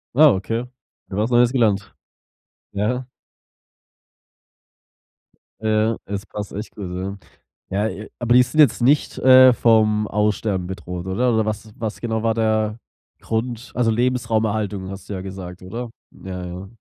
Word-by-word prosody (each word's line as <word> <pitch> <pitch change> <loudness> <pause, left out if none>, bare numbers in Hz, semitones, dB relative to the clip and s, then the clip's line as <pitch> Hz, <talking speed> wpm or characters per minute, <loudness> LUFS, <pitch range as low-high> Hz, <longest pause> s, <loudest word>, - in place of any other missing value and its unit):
Wow, 150 -3 +7
okay, 115 +5 -2 0.4
wieder 95 - -6
was 110 - 0
Neues 120 0 +5
gelernt. 105 -7 +1 0.8
Ja. 125 +6 -2 2.5
Ja, 110 +1 +1
das 100 0 -4
passt 105 -1 -6
echt 105 +3 -7
gut, 95 -4 -6
ja. 95 +2 -4 0.7
Ja, 105 0 -5
aber 120 0 0
die 125 - +8
sind 140 +5 -4
jetzt 145 -7 +5
nicht, 140 +5 +2
äh, 130 0 +8
vom 110 -3 +3
Aussterben 105 -3 0
bedroht 90 -1 -6
oder 120 +6 +1
oder 110 -1 +2
was 110 0 -4
was 110 -2 -4
genau 110 -2 -2
war 115 0 +2
der 110 -1 0 0.4
Grund, 115 +1 -3
also, 120 -2 +2
Lebensraumerhaltung 110 -4 0
hast 95 0 -9
du - - -5
ja 95 - -4
gesagt, 95 -1 -8
oder? 115 +6 -6 0.2
Ja, 90 -1 -7
ja. 90 +2 -7
110 Hz, 145 wpm, -21 LUFS, 100-120 Hz, 2.5 s, die